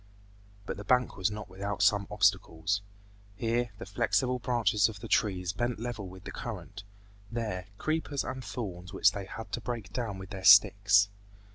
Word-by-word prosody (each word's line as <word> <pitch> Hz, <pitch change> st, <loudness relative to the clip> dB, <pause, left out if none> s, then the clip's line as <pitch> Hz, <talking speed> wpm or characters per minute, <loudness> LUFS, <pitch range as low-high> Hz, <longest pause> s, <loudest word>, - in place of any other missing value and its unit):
But -, -, -4 dB
the 105 Hz, -, -7 dB
bank 125 Hz, +4 st, +2 dB
was 95 Hz, +1 st, +1 dB
not 105 Hz, +1 st, -6 dB
without 100 Hz, +2 st, -3 dB
some 100 Hz, -1 st, +3 dB
obstacles: 100 Hz, -1 st, +1 dB, 0.5 s
here, 120 Hz, +2 st, 0 dB
the -, -, -7 dB
flexible 125 Hz, +5 st, +1 dB
branches 110 Hz, -4 st, +2 dB
of 105 Hz, -3 st, -9 dB
the -, -, -7 dB
trees 95 Hz, -3 st, +1 dB
bent 120 Hz, +4 st, -1 dB
level 115 Hz, -4 st, -4 dB
with 95 Hz, 0 st, -12 dB
the -, -, -7 dB
current; 105 Hz, -1 st, -7 dB, 0.5 s
there, 105 Hz, -6 st, -3 dB
creepers 155 Hz, -1 st, -1 dB
and 130 Hz, 0 st, -5 dB
thorns 90 Hz, -8 st, -6 dB
which -, -, +5 dB
they 100 Hz, -1 st, -5 dB
had 110 Hz, +3 st, -8 dB
to 120 Hz, -, -3 dB
break 110 Hz, -4 st, -5 dB
down 115 Hz, -6 st, -3 dB
with 95 Hz, +1 st, -9 dB
their 95 Hz, -2 st, -6 dB
sticks. 100 Hz, 0 st, +7 dB
105 Hz, 170 wpm, -30 LUFS, 95-120 Hz, 0.5 s, sticks